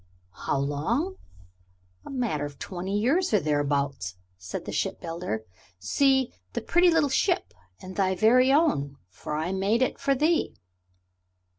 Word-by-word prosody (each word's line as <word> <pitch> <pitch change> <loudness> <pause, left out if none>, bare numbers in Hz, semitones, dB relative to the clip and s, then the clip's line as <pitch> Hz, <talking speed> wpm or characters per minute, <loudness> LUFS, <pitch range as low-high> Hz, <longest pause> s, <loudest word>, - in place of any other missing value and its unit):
"How - - +2
long? 175 - -1 0.9
a - - -10
matter 240 - -1
of 145 -1 -6
twenty 190 +2 -4
years 270 - +2
or - - +5
thereabouts," 140 - -1 0.2
said 90 0 -7
the - - -5
ship - - -2
builder. 165 -10 -4 0.3
"See, 265 - +2 0.2
the - - -2
pretty 350 +1 +4
little 325 -3 +3
ship; 350 - 0 0.3
and 185 0 -8
thy 190 -1 +1
very 250 +6 +5
own, 145 - +2
for 95 +10 -6
I 160 +4 -2
made 200 +6 +1
it - - -2
for 275 0 +1
thee." 315 +5 +1
190 Hz, 145 wpm, -26 LUFS, -, 0.9 s, or